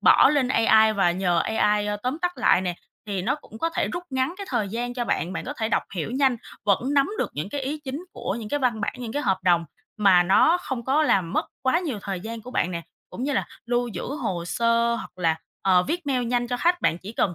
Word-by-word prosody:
bỏ - - +7
lên 275 -4 +2
AI 220 -2 +5
và 195 -4 +3
nhờ 175 -1 +1
AI, 210 +1 +1
ơ, 205 0 -1
tóm 255 +5 -2
tắt 355 0 +1
lại 180 - +4
nè, 180 -2 -2 0.3
thì 195 -3 -2
nó - - +1
cũng 225 -7 -12
có 330 - 0
thể - - -1
rút 350 - -3
ngắn 260 +5 0
cái 400 - -6
thời 225 -6 0
gian 240 +3 -3
cho 240 -2 -2
bạn, 185 -5 -1
bạn - - -4
có 265 - -4
thể 220 -1 -1
đọc - - +1
hiểu 175 +5 -3
nhanh, 260 -1 +2 0.3
vẫn 240 +8 +1
nắm 280 +5 +3
được - - -1
những 155 +7 -3
cái 285 +5 -4
ý 290 +3 -3
chính 280 +7 -5
của - - -3
những 215 - -6
cái 290 - 0
văn 235 -4 +1
bản, - - -1
những 235 -2 -5
cái 290 - -1
hợp 190 -1 +1
đồng 175 -2 +3 0.3
mà 195 -4 +5
nó 315 - +4
không 255 -7 -5
có 280 +4 +3
làm 190 - +2
mất - - +1 0.2
quá 265 +6 +3
nhiều 290 - -3
thời 190 -3 -4
gian 225 +2 -6
của 250 - -9
bạn 185 -7 0
nè. 170 -1 -4 0.3
Cũng 245 - -6
như 290 - 0
là - - 0 0.2
lưu 240 0 0
giữ 230 - -5 0.2
hồ 170 -2 -2
sơ, 235 +4 +2
hoặc 210 - -8
là, 165 -2 +2 0.3
ờ, 185 -2 +4
viết 335 - -3
mail 255 -3 +1
nhanh 240 0 0
cho 245 - -1
khách, 350 +6 +2
bạn 165 - +1
chỉ 200 +5 -9
cần, 175 -6 0
230 Hz, 265 wpm, -25 LUFS, 195-265 Hz, 0.3 s, bỏ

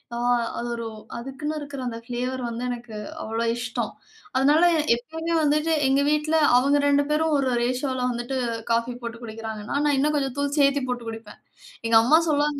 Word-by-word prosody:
ஆ, - - -3 0.4
அது 240 - -3
ஒரு 230 0 -5 0.3
அதுக்குன்னு 270 +5 -4
இருக்குற 285 -2 -7
அந்த 230 -1 -4
ஃப்ளேவர் 250 +2 -3
வந்து 235 +1 -4
எனக்கு 240 -2 -6 0.3
அவ்ளோ 225 +1 -2
இஷ்டம். 240 0 -3 0.5
அதனால 290 +5 +4 0.3
எப்பவுமே 320 +7 -4
வந்துட்டு 305 +2 +2 0.2
எங்க 270 +1 +3
வீட்ல 300 +1 +1 0.2
அவுங்க 280 +3 +3
2 285 0 +4
பேரும் 310 0 +2
ஒரு 275 -1 0 0.2
ரேஷியோல 255 +1 -1
வந்துட்டு 240 +2 -3 0.3
காஃபி 230 +1 +1
போட்டு 235 0 -6
குடிக்கிறாங்கன்னா, 220 +1 -5
நான் 290 -1 +3
இன்னும் 300 +2 +2
கொஞ்சம் 270 -3 -2
தூள் 285 0 0
சேர்த்திப் 275 -2 +3
போட்டு 240 -2 -3
குடிப்பேன். 225 0 -9 0.5
எங்க 230 0 +5
அம்மா 305 +7 +6
சொல்லுவாங்க. 295 -1 +1
265 Hz, 165 wpm, -24 LUFS, 235-290 Hz, 0.5 s, அம்மா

